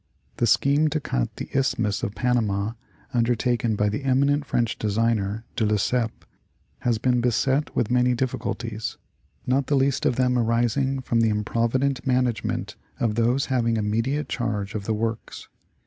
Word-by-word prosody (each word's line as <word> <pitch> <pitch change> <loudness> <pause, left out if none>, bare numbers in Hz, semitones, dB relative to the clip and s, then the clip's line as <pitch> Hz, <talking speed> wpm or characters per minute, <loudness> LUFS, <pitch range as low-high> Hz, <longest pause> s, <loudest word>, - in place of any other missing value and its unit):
The 120 - +2
scheme 140 +7 +3
to 155 +1 0
cut 60 - -2
the - - -5
Isth 135 0 +1
mus 105 -3 0
of 100 - -3
Panama, 110 -3 0 0.4
undertaken 120 -1 +1
by 105 0 +1
the 105 +6 -2
eminent 140 +2 +2
French 120 -3 0
engineer, 110 0 0
De - - 0
Lesseps, 110 +2 0 0.5
has 120 -2 +1
been 125 +2 +1
beset 130 +4 +1
with 120 -1 0
many 125 0 +3
difficulties, 115 -3 -3 0.5
not 130 +1 +1
the 145 - +2
least 135 0 +2
of - - +1
them 125 -1 +2
arising 120 +4 +1
from 120 -2 0
the 115 - +3
improvident 115 +5 0
management 125 -3 0 0.2
of 115 -3 +1
those 120 +4 +2
having 115 -2 +1
immediate 115 +8 0
charge 105 -5 -2
of 100 -2 -4
the 110 - 0
works. 115 +1 -4
120 Hz, 155 wpm, -24 LUFS, 110-130 Hz, 0.5 s, scheme